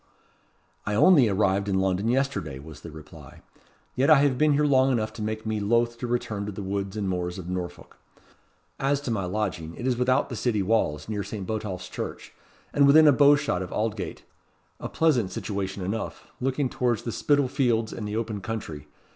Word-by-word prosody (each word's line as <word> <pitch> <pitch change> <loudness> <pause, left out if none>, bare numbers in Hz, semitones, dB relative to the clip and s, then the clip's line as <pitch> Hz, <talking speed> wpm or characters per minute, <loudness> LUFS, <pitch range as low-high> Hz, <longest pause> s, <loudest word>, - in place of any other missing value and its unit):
"I 105 - -2
only 135 - +6
arrived 100 0 +1
in 95 -1 +1
London 95 +2 0
yesterday," 125 - -1
was 75 +1 -11
the - - -9
reply; 80 -1 -13 0.5
"yet 135 +4 +2
I 155 - +9
have 140 -3 +3
been 150 +2 +3
here 150 +1 +2
long 135 -2 +4
enough 110 -3 -1
to 110 - -8
make 110 +1 -3
me 110 -1 -1
loth 115 +3 +1
to 125 - -3
return 110 -4 -2
to - - -3
the 100 +1 -6
woods 100 +1 -3
and 100 -2 -2
moors 90 -1 -2
of 90 -2 -7
Norfolk. 90 -1 -6 0.8
As 140 +1 +1
to 135 - -3
my 100 -5 -1
lodging, 90 -4 -3
it 120 - -6
is 125 -2 +1
without 125 +1 +2
the 125 - -5
city 110 -3 0
walls, 90 -8 0
near 105 -2 -2
St. 100 0 -6
Botolph's 105 -3 -4
Church, - - -7 0.4
and 140 -1 +5
within 155 +3 +7
a - - +8
bow 145 +2 +6
shot 145 -11 -1
of 90 - -6
Aldgate: 110 -2 -3 0.6
a - - -5
pleasant 130 - +1
situation 95 -2 -4
enough, 110 +4 -4
looking 135 +2 0
towards 120 -3 -1
the 115 - -3
Spital 145 +3 +2
Fields 120 -5 0
and 105 - -5
the 105 - -4
open 110 -3 -3
country. 95 -10 -6
110 Hz, 195 wpm, -26 LUFS, 95-125 Hz, 0.8 s, I